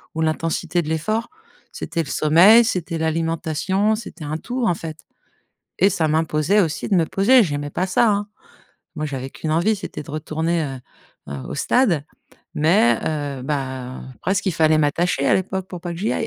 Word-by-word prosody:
ou 160 - -1
l'intensité 165 +2 0
de 155 - -6
l'effort. 215 - -1 0.4
C'était 165 - -3
le 160 - -6
sommeil, 180 +12 +6
c'était 180 -6 -2
l'alimentation, 165 +5 0
c'était 210 -7 -9
un 150 +2 -3
tout, 245 +6 -3
en 180 - +3
fait 160 -1 -7 0.8
et 195 - +5
ça 170 -5 0
m'imposait 155 +4 +2
aussi 165 -5 -1
de 200 - +3
me 165 -3 +3
poser, 235 +6 +5
j'aimais 145 -5 -2
pas 185 +5 -1
ça, 215 +3 +3
hein, 205 0 -1 0.7
moi, 155 -1 -3
j'avais 135 -3 -4
qu'une 155 - -5
envie, 175 +8 +2
c'était 195 - -7
de 140 - -11
retourner, 160 +2 -1
heu 135 -2 -4 0.6
heu, 70 - -5
au - - -5
stade. 205 - +2 0.5
Mais 185 +10 +3
heu, 145 -4 -3
bah, 130 -2 -4 0.2
presque, 190 +1 0
il 190 - +2
fallait 155 -1 +3
m'attacher 145 -1 +1
à - - +4
l'époque 190 0 -2
pour 180 -2 -7
pas 175 -1 -4
que 170 - -7
j'y 210 - 0
aille. 225 - -2
165 Hz, 185 wpm, -21 LUFS, 155-195 Hz, 0.8 s, sommeil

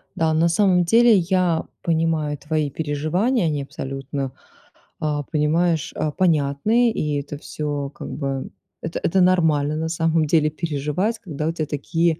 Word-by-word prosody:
Да, 160 -1 +1
на 165 +2 +3
самом 180 0 +3
деле 230 +4 +5
я 180 -2 +1 0.2
понимаю 160 -3 0
твои 150 0 -1
переживания, 160 - 0
они 150 -3 0
абсолютно 135 0 -5 0.7
а, 150 -1 -1
понимаешь, 160 +2 0
а, 155 -1 -1
понятны, 180 - +2
и 150 -8 -1
это 145 0 -7
всё, 145 -2 -4
как - - -9
бы, 135 -2 -3 0.3
это 160 - -4
это 190 +3 +2
нормально, 160 -5 +3
на 160 0 -2
самом 165 -1 +1
деле, 155 0 +3
переживать, 155 +7 -2
когда 155 -6 -4
у - - +1
тебя 155 -2 -2
такие, 165 +3 0
160 Hz, 150 wpm, -22 LUFS, 145-170 Hz, 0.7 s, деле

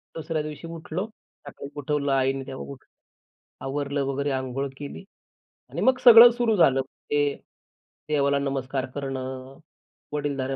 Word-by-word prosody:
दुसऱ्या 160 -1 -2
दिवशी 155 +2 -7
उठलो. 165 +4 -5 0.4
सकाळी 140 0 -9
उठवलं 145 0 -1
आईने, 135 0 +1
तेव्हा 130 -1 -7
उठलं, 135 - -13 0.8
आवरलं 140 +1 -2
वगैरे, 140 +1 -1
अंघोळ 130 +1 -2
केली 145 +5 -8 0.7
आणि - - -5
मग 260 0 +4
सगळं 240 -1 +11
सुरू 235 -2 +1
झालं. 135 -8 +4
ते 145 +2 -2 0.8
देवाला 140 -1 +2
नमस्कार 135 -1 -2
करणं, 130 -1 -5 0.6
वडीलधाऱ्या 140 -2 -2
140 Hz, 125 wpm, -25 LUFS, 135-150 Hz, 0.8 s, सगळं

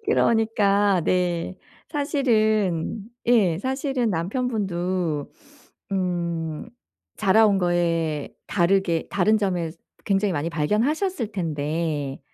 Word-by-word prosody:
그러니까 205 - +3
네 180 0 0 0.3
사실은 220 - +1 0.3
예 205 -9 +4
사실은 260 0 -1
남편분도 180 - -2 0.6
음 170 -2 -2 0.5
자라온 210 0 +4
거에 165 -4 0 0.2
다르게 175 -2 +1
다른 210 +3 +3
점을 180 -5 -1 0.3
굉장히 195 0 +1
많이 160 +1 -2
발견하셨을 230 - 0
텐데 155 -4 -2
190 Hz, 200 characters per minute, -24 LUFS, 170-220 Hz, 0.6 s, 예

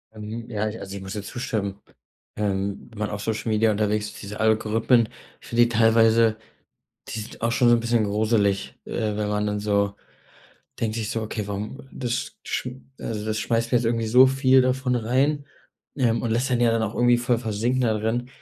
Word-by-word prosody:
Mhm, 110 +2 -7
ja, 105 -4 -3
also, 105 -2 -5
ich 100 - -6
muss 95 0 -7
dir 105 -2 -5
zustimmen. 100 -3 -3 0.6
Ähm, 100 -1 -2
wenn 110 - -12
man 105 -1 -1
auf 105 0 -5
Social 110 +1 -2
Media 110 +1 +3
unterwegs 105 0 0
ist - - -10
diese 105 0 -7
Algorithmen, 110 +2 +3 0.3
ich - - -14
finde 120 +1 +4
die 120 - +2
teilweise 115 0 +4 0.7
die 110 - -4
sind 110 - -9
auch 115 +1 +1
schon 120 +1 +3
so 120 - +7
'n - - +1
bisschen 115 -1 +1
gruselig. 105 -1 0
Äh, - - -10 0.3
wenn 105 -1 -1
man 105 0 0
dann 105 0 -1
so 100 -1 0 0.9
denkt 110 -2 -1
sich 110 -2 -2
so, 115 - -2
okay, 110 -1 -4
warum 105 +7 -5
das 120 -1 -3
schm 130 +1 -5
also, 105 -2 -4
das 110 0 -1
schmeißt 115 +1 0
mir 120 - +5
jetzt 120 - -3
irgendwie 115 -1 0
so 125 +4 +7
viel 130 0 +4
davon 130 0 0
rein, 135 +5 +1 0.5
ähm, 120 -4 +1
und 115 - -1
lässt 120 +4 0
einen 125 -1 +1
ja 120 -1 +4
dann 115 0 +1
auch 110 0 -2
irgendwie 120 0 +4
voll 120 0 +1
versinken 120 +3 -1
da 110 -3 +1
drin. 115 +3 -1
110 Hz, 205 wpm, -24 LUFS, 105-120 Hz, 0.9 s, so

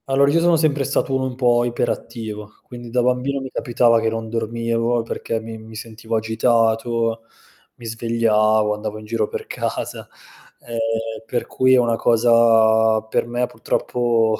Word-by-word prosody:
Allora, 140 +1 +3
io 165 - +3
sono 170 0 +3
sempre 150 -3 +1
stato 135 - -1
uno 130 0 0
un 130 -1 -4
pò 120 -2 +3
iperattivo, 115 -3 -4
quindi 120 -1 -10
da 125 +1 +1
bambino 125 +3 0
mi 130 -1 -7
capitava 120 -1 +2
che 115 - +1
non 110 0 -5
dormivo 115 +1 -1
perché 115 0 -3
mi 110 0 -8
mi 110 0 -12
sentivo 110 +1 -6
agitato, 115 0 +1 0.5
mi 120 - -13
svegliavo, 110 -2 +1
andavo 105 0 -5
in 110 - -10
giro 110 -1 -1
per - - -6
casa, - - -5 0.5
ehm, 115 -1 -3
per 120 +2 -3
cui 130 0 +2
è - - +4
una 120 -2 +2
cosa 115 -1 +4
per 110 - 0
me 120 +1 -1
purtroppo 120 -2 0
115 Hz, 160 wpm, -21 LUFS, 110-120 Hz, 0.5 s, è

